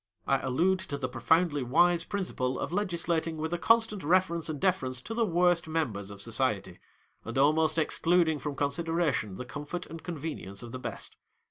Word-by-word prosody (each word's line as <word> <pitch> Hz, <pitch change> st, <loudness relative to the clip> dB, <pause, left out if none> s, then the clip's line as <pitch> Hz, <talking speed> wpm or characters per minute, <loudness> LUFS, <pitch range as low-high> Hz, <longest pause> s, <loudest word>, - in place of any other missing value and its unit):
I 135 Hz, -, +2 dB
allude 170 Hz, +9 st, +1 dB
to 155 Hz, -6 st, -5 dB
the 130 Hz, -2 st, -2 dB
profoundly 160 Hz, +3 st, +2 dB
wise 165 Hz, +7 st, +3 dB
principle 180 Hz, -11 st, -2 dB
of -, -, -4 dB
legislating 170 Hz, -4 st, -1 dB
with 160 Hz, +2 st, -3 dB
a 175 Hz, -, -1 dB
constant 225 Hz, -2 st, +3 dB
reference 170 Hz, 0 st, +2 dB
and 150 Hz, -2 st, -3 dB
deference 130 Hz, -9 st, 0 dB
to 225 Hz, -, -6 dB
the 230 Hz, -1 st, +1 dB
worst 175 Hz, -1 st, +2 dB
members 120 Hz, -12 st, -2 dB
of 100 Hz, 0 st, -6 dB
society, 105 Hz, -6 st, -1 dB, 0.4 s
and 115 Hz, +3 st, -5 dB
almost 155 Hz, +3 st, +3 dB
excluding 165 Hz, 0 st, +2 dB
from 145 Hz, -1 st, -4 dB
con 140 Hz, 0 st, 0 dB
sideration 165 Hz, -, -1 dB
the 125 Hz, -, -6 dB
comfort 150 Hz, +7 st, -6 dB
and 165 Hz, +1 st, -9 dB
convenience 145 Hz, -, -6 dB
of 120 Hz, -, -8 dB
the 130 Hz, -, -6 dB
best. -, -, -6 dB
160 Hz, 175 wpm, -29 LUFS, 130-175 Hz, 0.4 s, wise